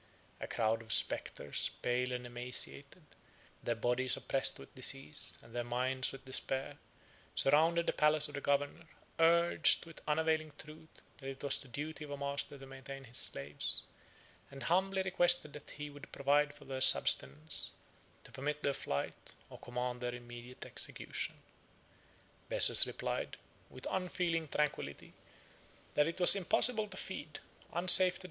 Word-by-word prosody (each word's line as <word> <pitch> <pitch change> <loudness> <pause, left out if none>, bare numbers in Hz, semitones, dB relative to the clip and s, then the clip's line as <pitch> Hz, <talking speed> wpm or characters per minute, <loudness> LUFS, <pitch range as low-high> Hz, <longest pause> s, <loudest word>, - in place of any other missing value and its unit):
A - - -5
crowd 115 0 0
of 110 -2 -9
spectres, 70 - 0
pale 125 +1 0
and 125 0 -4
emaciated, 125 +6 -5 0.6
their 120 - -1
bodies 125 +3 +1
oppressed 135 - +1
with - - -13
disease, 135 +3 -1
and 115 - -16
their 120 - -1
minds 125 +2 0
with 135 - -11
despair, 130 0 0 0.6
surrounded 165 +4 +3
the - - 0
palace 150 0 +3
of 145 - -11
the 140 - -4
governor, 145 +4 -1 0.3
urged, 170 +1 +4
with 165 -1 -13
unavailing 155 0 0
truth, 160 +1 -11 0.3
that 135 -1 -6
it 135 +1 -8
was 140 - +1
the - - -12
duty 150 +5 -6
of 150 - -9
a 145 - -5
master 140 0 -4
to 135 - -11
maintain 135 +1 -9
his 120 -1 -5
slaves, 70 +1 -1 0.7
and 135 -2 -9
humbly 190 +5 +1
requested 175 -4 +2
that 150 - -11
he 150 0 -7
would 145 0 -12
provide 145 +1 +2
for - - -15
their 135 -1 -5
subsistence, 75 - +3 0.5
to - - -14
permit 150 +2 -4
their 140 - +1
flight, 70 - -5 0.2
or - - -11
command 125 0 -4
their 125 0 -3
immediate 120 +1 -10
execution. - - -5
135 Hz, 125 wpm, -34 LUFS, 125-150 Hz, 0.7 s, urged